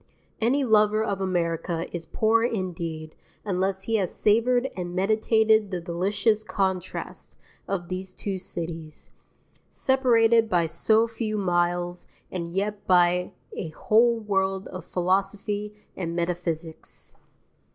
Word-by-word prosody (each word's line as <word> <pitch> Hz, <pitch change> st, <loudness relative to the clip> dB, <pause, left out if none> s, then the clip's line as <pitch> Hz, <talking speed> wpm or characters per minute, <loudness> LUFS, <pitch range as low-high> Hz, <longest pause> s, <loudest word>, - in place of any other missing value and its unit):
Any 255 Hz, +5 st, +2 dB
lover 215 Hz, -2 st, +4 dB
of 200 Hz, -3 st, -2 dB
America 170 Hz, -2 st, -1 dB
is 165 Hz, -1 st, -6 dB
poor 225 Hz, +1 st, +2 dB
indeed 170 Hz, -8 st, -3 dB, 0.3 s
unless 190 Hz, 0 st, -1 dB
he 225 Hz, +2 st, +1 dB
has 190 Hz, -4 st, -1 dB
savoured 245 Hz, +4 st, +2 dB
and 175 Hz, -1 st, -5 dB
meditated 220 Hz, +2 st, +3 dB
the 185 Hz, -2 st, -3 dB
delicious 195 Hz, +5 st, 0 dB
contrast 190 Hz, -4 st, -3 dB, 0.3 s
of 180 Hz, -3 st, -2 dB
these 185 Hz, +1 st, -5 dB
two 195 Hz, -2 st, -3 dB
cities, 165 Hz, -3 st, -7 dB, 0.6 s
separated 230 Hz, -4 st, +3 dB
by 175 Hz, -4 st, +3 dB
so 220 Hz, +7 st, +3 dB
few 225 Hz, -2 st, -3 dB
miles 175 Hz, -1 st, 0 dB, 0.2 s
and 170 Hz, -2 st, -4 dB
yet 205 Hz, +1 st, -2 dB
by 180 Hz, 0 st, +3 dB, 0.2 s
a 165 Hz, -, -4 dB
whole 230 Hz, +8 st, +3 dB
world 195 Hz, -2 st, -1 dB
of 185 Hz, -, -8 dB
philosophy 200 Hz, +3 st, -1 dB, 0.2 s
and 170 Hz, -2 st, -4 dB
metaphysics. 170 Hz, -2 st, -3 dB
190 Hz, 120 wpm, -26 LUFS, 175-220 Hz, 0.6 s, lover